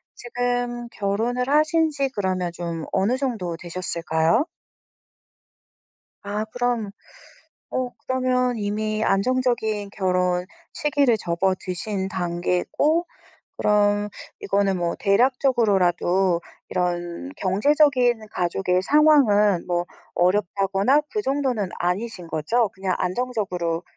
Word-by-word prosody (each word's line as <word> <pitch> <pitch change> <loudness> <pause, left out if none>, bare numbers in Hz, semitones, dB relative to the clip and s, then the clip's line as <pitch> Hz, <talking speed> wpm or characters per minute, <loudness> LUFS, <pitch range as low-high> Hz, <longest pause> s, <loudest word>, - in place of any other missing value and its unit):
지금 245 0 -2
결혼을 230 +6 -1
하신지 305 -2 +2
그러면 185 -3 -1
좀 170 -2 -5
어느 225 +7 +2
정도 215 -11 -3
되셨을까요? 170 - 0 1.7
아 205 +1 -3
그럼 240 -3 -2 0.8
어 255 -1 -2
그러면 255 -1 0
이미 215 +1 -2
안정적인 220 -2 0
결혼 180 -2 0 0.3
시기를 285 -6 +2
접어드신 190 +2 -2
단계고 180 - 0 0.5
그럼 205 0 +2 0.3
이거는 195 -1 +1
뭐 170 -1 -1
대략적으로라도 195 -6 +2 0.3
이런 175 - -2
경제적인 245 +2 +2
가족의 180 +1 0
상황은 210 - +4
뭐 175 0 0 0.3
어렵다거나 195 +7 +2
그 425 - -1
정도는 265 - -1
아니신 180 0 -2
거죠? 215 +10 +1
그냥 190 -2 -2
안정적으로 180 -6 -2
205 Hz, 235 characters per minute, -23 LUFS, 180-245 Hz, 1.7 s, 상황은